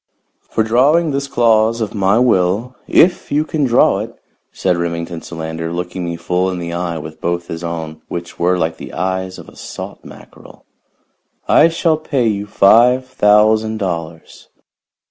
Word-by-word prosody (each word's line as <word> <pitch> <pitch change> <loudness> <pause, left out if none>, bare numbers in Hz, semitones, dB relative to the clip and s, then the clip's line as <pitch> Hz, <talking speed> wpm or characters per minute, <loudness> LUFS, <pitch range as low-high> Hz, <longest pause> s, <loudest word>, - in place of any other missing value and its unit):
"For 110 - +1
drawing 145 +9 +3
this 140 0 -2
clause 115 -2 +2
of 110 -2 -3
my 100 0 +2
will, 115 +1 +1
if 175 +1 +3
you 150 +2 +1
can 155 -3 -1
draw 120 -2 +3
it," - - -5 0.4
said 90 - 0
Remington 85 0 -4
Solander, 80 0 -5
looking 90 +1 -4
me 85 -1 -3
full 90 +2 -1
in 90 - -4
the 85 -1 -5
eye 85 -1 -3
with 80 0 -9
both 85 0 -2
his 80 +1 -6
own, 80 -2 -5
which 85 0 -7
were 90 +1 +2
like 80 -1 -1
the - - -10
eyes 95 0 -3
of - - -12
a - - -15
salt - - -9
mackerel, - - -15 0.8
"I 160 - +6
shall 165 -1 +1
pay 140 -6 -1
you 105 -1 -2
five 120 +6 +4
thousand 110 -2 +3
dollars." 85 -5 -6
95 Hz, 165 wpm, -17 LUFS, 85-120 Hz, 0.8 s, I